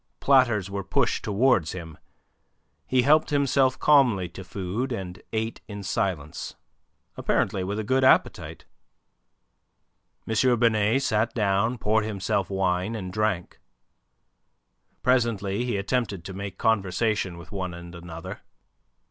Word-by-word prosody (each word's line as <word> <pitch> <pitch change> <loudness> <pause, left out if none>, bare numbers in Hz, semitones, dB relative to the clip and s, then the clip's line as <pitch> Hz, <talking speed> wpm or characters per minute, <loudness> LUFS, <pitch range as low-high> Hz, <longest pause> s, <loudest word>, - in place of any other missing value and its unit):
Platters 120 -8 +3
were 100 0 -4
pushed - - 0
towards 105 - +2
him. 80 -4 -8 0.9
He 130 -1 +3
helped 155 +4 +4
himself 140 -2 +2
calmly 125 -11 +4
to 95 +3 -9
food, 100 +8 -4
and 95 -6 -5
ate 110 0 -3
in 105 -1 -7
silence, 90 -6 -3 0.6
apparently 95 - 0
with 100 +3 -3
a 110 - -2
good 130 +5 +1
appetite. 130 - +2 1.6
M. 115 +2 +2
Binet 115 +2 +3
sat 110 0 0
down, 105 +2 +1
poured 110 0 +1
himself 100 -2 -1
wine, 95 +2 0
and 95 -4 -6
drank. 105 -4 -1 1.4
Presently 115 -4 +1
he 120 -5 -1
attempted 100 -3 -2
to 95 - -6
make 100 +1 -6
conversation 100 -3 0
with 85 +3 -12
one 95 -3 -4
and 85 0 -10
another. 85 -1 -8
105 Hz, 120 wpm, -25 LUFS, 95-120 Hz, 1.6 s, helped